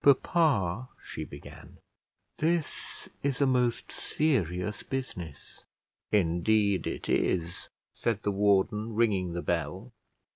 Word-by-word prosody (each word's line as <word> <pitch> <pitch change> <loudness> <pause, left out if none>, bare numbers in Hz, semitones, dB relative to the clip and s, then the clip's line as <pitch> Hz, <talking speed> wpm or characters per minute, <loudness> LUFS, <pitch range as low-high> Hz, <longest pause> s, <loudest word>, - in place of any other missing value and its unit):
"Papa," 130 - +3 0.2
she - - -5
began, - - -11 0.6
"this 165 -1 -1
is 140 -2 0
a 140 - +5
most 125 -3 +1
serious 105 - 0
business." 90 - -6 0.5
"Indeed 100 +2 +3
it - - -4
is," 85 -1 0 0.2
said 110 -3 -1
the 105 - +1
warden, 105 +2 +2
ringing 100 -6 +2
the 85 - -3
bell. 90 - -2
105 Hz, 105 wpm, -29 LUFS, 90-125 Hz, 0.6 s, a